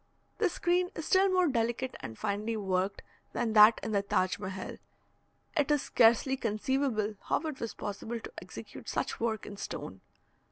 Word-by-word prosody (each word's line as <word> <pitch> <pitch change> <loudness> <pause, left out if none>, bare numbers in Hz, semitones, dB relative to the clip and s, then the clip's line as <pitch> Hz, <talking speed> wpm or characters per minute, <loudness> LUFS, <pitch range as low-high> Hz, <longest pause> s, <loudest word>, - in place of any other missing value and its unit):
This 400 -6 +2
screen 355 +1 +1
is 320 - -5
still 385 +1 +4
more 365 -1 +3
delicate 240 0 -1
and 110 -1 -7
finely 215 +2 -2
worked 190 -1 -1 0.3
than 230 -2 0
that 215 +1 +8
in - - -2
the 200 -2 +2
Taj 185 -2 +1
Mehal; 190 -1 -6 0.8
it 295 -3 +2
is 295 -2 +3
scarcely 235 +3 +4
conceivable 225 -1 0
how - - +1
it 310 -4 -5
was 230 - -4
possible 220 +3 -4
to - - -9
execute - - -9
such - - -2
work 225 -2 -1
in 205 - -8
stone. 95 - -6
225 Hz, 165 wpm, -31 LUFS, 205-275 Hz, 0.8 s, that